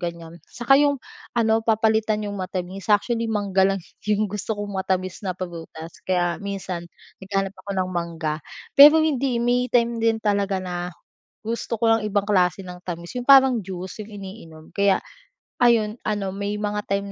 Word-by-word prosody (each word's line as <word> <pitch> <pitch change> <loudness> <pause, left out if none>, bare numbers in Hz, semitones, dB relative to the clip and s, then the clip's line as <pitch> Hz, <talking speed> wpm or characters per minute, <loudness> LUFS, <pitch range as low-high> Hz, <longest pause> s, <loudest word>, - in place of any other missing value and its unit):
ganiyan. 170 -1 -6
'Saka 270 +4 +3
'yung 285 -1 +3 0.4
ano 225 -1 +3
papalitan 220 -1 +1
'yung 205 -1 -4
matamis, 185 +2 -5
actually 230 +2 +2
mangga 195 -3 +2
lang 195 0 0 0.3
'yung 210 0 +2
gusto 210 +1 -3
kong 205 0 -5
matamis 185 -1 -2
na 185 -3 -4
prutas. 165 -2 -8
Kaya 175 -1 +1
minsan 190 -3 -5 0.3
naghahanap 195 0 -2
ako 195 +1 -11
ng 185 -1 0
mangga. 165 -3 -3 0.3
Pero 295 +3 +9
hindi, 275 -5 +1
eh, 235 - 0
may 245 +1 +2
time 235 -1 +1
din 225 0 +2
talaga 200 -1 +1
na, 180 -1 -4 0.5
gusto 230 0 -4
ko 225 -1 +4
ang 225 - -4
ibang 205 0 0
klase 180 -1 +2
ng 180 -1 -9
tamis, 170 -1 -6
'yung 245 - -3
parang 265 -4 +6
juice 185 +3 -7
'yung 215 - -14
iniinom, 190 -6 -10
kaya 200 -1 +3 0.6
ayon 230 -2 +3
ano 205 -3 -1
may 200 +1 -3
mga 210 0 -2
time 200 0 -2
200 Hz, 170 wpm, -23 LUFS, 185-225 Hz, 0.6 s, Pero